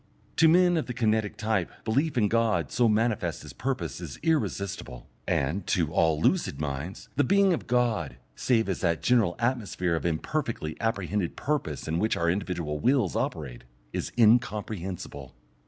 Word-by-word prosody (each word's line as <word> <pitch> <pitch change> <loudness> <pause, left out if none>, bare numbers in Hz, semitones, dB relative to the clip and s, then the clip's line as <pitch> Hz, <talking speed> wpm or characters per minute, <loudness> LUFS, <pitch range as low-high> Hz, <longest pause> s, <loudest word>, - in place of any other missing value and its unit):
To 165 - +6
men 175 +1 +5
of 160 - -2
the 125 - -5
kinetic 110 -3 0
type 105 -5 0 0.2
belief 140 +6 +1
in 105 -3 +4
God 115 0 +1
so 120 -2 +3
manifest 105 - 0
as - - -10
purpose 130 0 -3
is - - -7
irresistible, 100 - -2 0.2
and, 85 +8 0
to 80 -3 +1
all 80 -3 +3
lucid 165 - +1
minds, 75 +5 -4
the 145 - +4
being 195 +5 +4
of 165 - -4
God, 115 - 0 0.2
save 115 -4 +1
as 95 - -2
that 85 -3 0
general 115 -8 +3
atmosphere 110 -8 -1
of 80 - -3
imperfectly 85 - -2
apprehended 100 -4 -1
purpose 135 - -2
in 80 +1 0
which 110 +3 +1
our 85 0 +2
individual 85 -5 -3
wills 125 - +2
operate, 60 -6 -3 0.3
is - - -3
incomprehensible. 100 - 0
105 Hz, 155 wpm, -27 LUFS, 85-125 Hz, 0.3 s, To